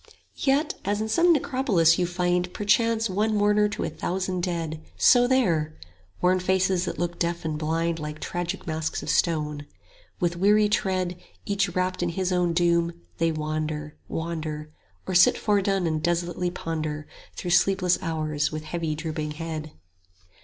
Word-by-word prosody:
Yet 285 +3 +1
as 205 +1 0
in 220 - -1
some 340 +9 +4
necropolis 235 - +3
you 175 - +1
find 180 0 +1
50 180 - -19
Perchance 225 +2 +2
one 210 +3 0
mourner 210 0 +3
to 210 - -4
a - - -1
thousand 185 +2 -2
dead, 165 -3 -3 0.2
So 245 -1 +6
there: 170 -13 +1 0.5
worn 185 +1 +4
faces 185 0 +1
that - - -4
look 175 +1 -3
deaf 170 -1 -1
and 155 -1 -1
blind 165 +2 -1
Like 150 0 -6
tragic 175 +2 -4
masks 160 -1 -3
of - - -1
stone. 150 -3 0 0.5
With 175 -2 0
weary 210 +3 +4
tread, 185 -3 0 0.3
Each 200 -1 +1
wrapt 185 0 0
in 175 - 0
his 185 +2 -1
own 180 -2 +1
doom, 170 0 +2 0.3
they 165 0 +2
wander, 155 -1 -3
wander, 155 -2 -4 0.3
Or 190 - -3
sit 180 - +6
foredone 195 -3 +1
and 155 -2 0
desolately 175 +1 0
ponder 155 -3 -4 0.3
55 - - -28
Through 175 - -3
sleepless 180 -1 +3
hours 155 -3 -1
with 155 0 -5
heavy 160 -1 -3
drooping 155 -1 -4
head. 155 -1 -5
175 Hz, 160 wpm, -25 LUFS, 160-190 Hz, 0.5 s, So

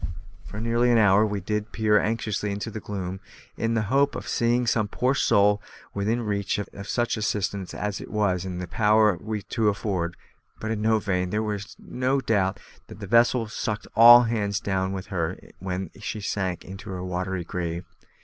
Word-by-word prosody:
For 100 +11 -8
nearly 115 +2 +2
an 120 - +5
hour 105 0 +5
did 105 +3 -2
we - - -31
peer 105 -1 +3
anxiously 105 -1 -1
into 105 +3 -4
the 110 - -5
gloom, 95 -3 -5 0.4
in 115 0 -1
the 110 - +1
hope 140 +6 +2
of - - -6
seeing 120 +1 +1
some 115 -3 +1
poor 125 +5 0
soul 105 -5 +3 0.3
within 110 +4 0
reach 100 -2 -1
of 100 -1 -6
such 120 -1 0
assistance 100 -2 -2
as 105 -1 -3
it - - -9
was 100 -4 0
in 90 -2 -5
our 90 - -3
power 105 +3 +3
to 110 +3 -1
afford, 95 -4 -2 0.4
but 110 - -3
in 110 0 +2
vain; 90 -2 -1
there 105 +1 -1
is 100 0 -7
no 130 +2 -1
doubt 105 -6 0 0.3
that - - -11
the 100 - -6
vessel 115 +2 +3
sucked 105 -1 -3
all 120 +2 +10
hands 105 -4 -1
down 95 -2 -1
with 95 -1 -5
her 85 -3 -1 0.2
when 95 0 -4
she 105 +1 -4
sank 95 -3 -2
into 95 +3 -9
her 90 -1 -5
watery 90 0 -3
grave. 85 0 -4
105 Hz, 180 wpm, -25 LUFS, 95-110 Hz, 0.4 s, all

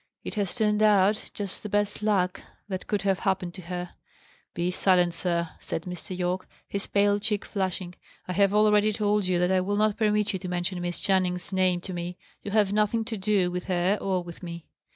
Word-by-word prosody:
It - - -5
has 200 -4 -1
turned 210 -2 +2
out 210 0 +4
just 200 -2 -5
the 210 - -6
best 205 +1 0
luck 195 -4 +1 0.3
that 190 -2 -5
could 205 -2 0
have 195 -1 +2
happened 185 -3 -1
to 185 - -8
her." 180 0 -5 0.6
"Be 175 +1 0
silent, 180 -2 +3
sir," 170 -1 -1
said 160 - -4
Mr. 180 +1 -6
Yorke, 180 +1 -1 0.2
his 200 0 -4
pale 205 0 +3
cheek 205 0 -1
flushing. 185 -3 -2 0.3
"I 180 - -2
have 200 +1 +4
already 210 0 +4
told 210 -2 +1
you 180 -1 +2
that 180 +1 +2
I 185 -1 +3
will 205 +2 -1
not 215 -1 +2
permit 210 -1 +2
you 190 - -2
to 180 - -6
mention 180 +1 -2
Miss 175 0 -3
Channing's 185 -1 +1
name 185 -2 +2
to 185 - -6
me. 175 +1 -4 0.2
You - - -6
have 205 -1 +2
nothing 215 +2 +2
to 225 - -4
do 195 -2 +1
with 180 0 -4
her 185 +2 +1
or 185 -2 0
with 170 -1 -10
me." 170 -2 -7
190 Hz, 210 wpm, -27 LUFS, 180-205 Hz, 0.6 s, out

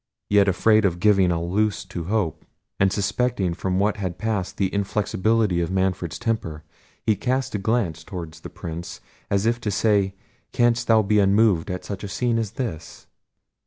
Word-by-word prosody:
Yet 100 -1 +5
afraid 110 +4 +4
of 90 -3 +1
giving 95 -1 +4
a 85 - 0
loose 100 +4 0
to 90 -3 -6
hope, 100 -5 -1 0.4
and 95 0 +3
suspecting 100 -2 0
from 90 +1 -2
what 100 +2 +1
had 95 -4 -4
passed 105 -4 -2
the 95 -2 0
inflexibility 105 -1 +1
of 85 - -1
Manfred's 95 -2 -1
temper, 110 -10 -3 0.4
he 110 - +3
cast 130 +3 -1
a 105 - -1
glance 95 -7 -1
towards 85 -3 -7
the - - -9
Prince, 85 +1 -7 0.3
as 100 +1 +1
if 120 +1 +1
to 105 - -2
say, 100 -1 +2 0.4
canst 120 0 +2
thou 110 -1 +5
be 105 +1 +2
unmoved 100 -3 +3
at 90 0 -4
such 100 -1 -6
a - - -3
scene 115 +3 0
as 110 -2 -3
this? 100 -11 -6
100 Hz, 175 wpm, -23 LUFS, 90-110 Hz, 0.4 s, Yet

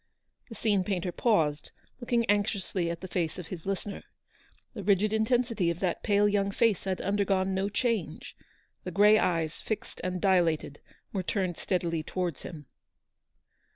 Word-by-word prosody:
The 225 - -8
scene 205 -3 +1
painter 180 -2 -2
paused, 160 -9 +1 0.3
looking 240 -1 +1
anxiously 200 -3 0
at 170 0 -4
the 185 - -6
face 170 -3 -2
of 180 -3 -8
his 180 -1 -7
listener. 195 +1 -3 0.7
The 220 - -6
rigid 205 +2 +3
intensity 225 -4 +1
of 170 0 -2
that 180 -3 0
pale 205 -1 +3
young 200 -1 +1
face 215 -1 +1
had 190 -1 -1
undergone 195 -1 +1
no 190 +1 0
change; 225 -3 -2 0.5
the - - -4
grey 210 +4 +6
eyes, 165 -3 0
fixed 220 - -5
and 185 0 -2
dilated, 170 -6 +2 0.3
were 195 - 0
turned 180 0 -1
steadilv 170 -3 -1
towards 180 -5 -2
him. 155 -4 -8
190 Hz, 155 wpm, -29 LUFS, 175-205 Hz, 0.7 s, grey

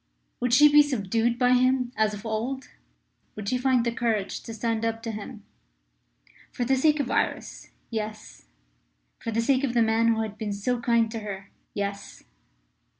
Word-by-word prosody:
Would 245 -1 0
she 295 +5 +8
be 295 0 +7
subdued 235 -3 0
by 250 0 +3
him 255 0 +2
as 215 -1 +1
of 205 +2 -11
old? 235 +5 -3 0.7
Would 210 -1 -7
she 250 - 0
find 255 -2 +2
the 235 - +1
courage 225 -5 -1
to - - -9
stand 225 0 -2
up 225 0 -2
to 230 - -3
him? 215 +1 -8 1.1
For 245 - -2
the 265 +2 +3
sake 300 +3 +3
of 260 -3 -1
Iris - - -2 0.2
yes. 215 - -6 0.7
For - - -5
the 225 +1 0
sake 265 +3 +2
of 250 -3 -1
the 235 - +5
man 225 +1 +2
who 225 -1 +2
had 215 -1 -7
been 210 -2 -3
so 240 +5 -1
kind 235 -2 +2
to 225 - -4
her 195 -2 -7 0.2
yes. 200 0 -5
230 Hz, 180 wpm, -26 LUFS, 215-250 Hz, 1.1 s, she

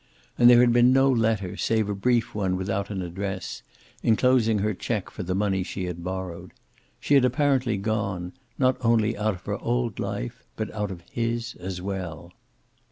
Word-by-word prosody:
And 120 0 +7
there 120 0 +8
had 120 -1 +4
been 120 +1 +6
no 135 +1 +5
letter 110 -6 0
save 110 -2 +1
a 105 - -1
brief 120 +3 +1
one 95 -3 0
without 100 +1 -2
an 95 -3 -3
address, 95 +2 -5 0.4
enclosing 115 -1 +3
her 105 +1 0
check 105 +1 -3
for - - -7
the 90 +1 -2
money 95 -1 +1
she 95 0 -4
had 85 -1 -5
borrowed. 90 -1 -5 0.5
She - - 0
had 140 -2 +6
apparently 130 -3 +2
gone, 100 -4 -2 0.2
not 130 -1 +3
only 115 -1 +2
out 105 0 0
of 90 - -15
her 100 0 -3
old 120 -2 -1
life, - - -4
but 110 - -4
out 105 -2 -2
of 90 -3 -8
his 115 0 -2
as 90 0 -5
well. 90 -4 -5
105 Hz, 180 wpm, -25 LUFS, 95-120 Hz, 0.5 s, there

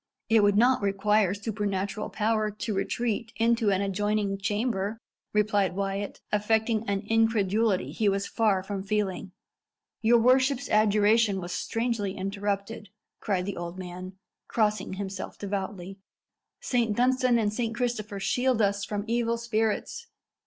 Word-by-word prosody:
"It 225 -1 +5
would 205 0 +3
not 250 +2 +4
require 200 0 +2
supernatural 205 -1 -3
power 215 0 0
to 210 +1 -4
retreat 230 +2 -2
into 230 -1 +2
an 195 -1 +2
adjoining 200 0 -1
chamber!" 210 0 -1 0.3
replied 205 -3 +1
Wyat, 195 +1 -3
affecting 220 +1 +1
an 200 -1 0
incredulity 215 - +1
he 205 +6 +1
was 195 0 0
far 210 -5 +1
from 195 0 -4
feeling. 195 -2 -2 0.7
"Your 235 +1 +5
worship's 260 +3 +3
adjuration 215 0 +3
was 175 -1 -6
strangely 225 -1 -2
interrupted," 200 +2 -3 0.3
cried 185 -3 -1
the 200 - -4
old 175 +1 -6
man, 185 0 -7 0.3
crossing 215 -3 0
himself 195 0 -5
devoutly. 195 -1 -5 0.6
"Saint 230 -4 0
Dunstan 255 0 +3
and 210 -2 0
Saint 230 0 -2
Christopher 235 -4 -2
shield 250 +4 +1
us 200 -1 +1
from 205 0 -3
evil 235 0 0
spirits!" 230 - -2
210 Hz, 130 wpm, -27 LUFS, 195-225 Hz, 0.7 s, It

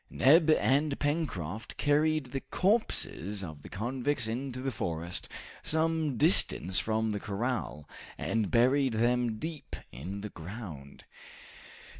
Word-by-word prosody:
Neb 160 +4 +5
and 145 -1 +3
Pencroft 125 - -2
carried 150 -2 +2
the 135 - -2
corpses 105 - 0
of 80 -5 -8
the - - -11
convicts 125 +4 -1
into 125 +3 -4
the 135 +1 -2
forest, 85 -5 -3 0.3
some 160 -3 0
distance 110 - +4
from 110 0 0
the 105 - -2
corral, 105 - -3 0.3
and 110 -3 -1
buried 130 +2 +3
them 120 0 +1
deep 160 +4 -6 0.2
in 90 +11 -6
the 105 - -5
ground. 80 -7 -9
120 Hz, 120 wpm, -30 LUFS, 100-145 Hz, 0.3 s, Neb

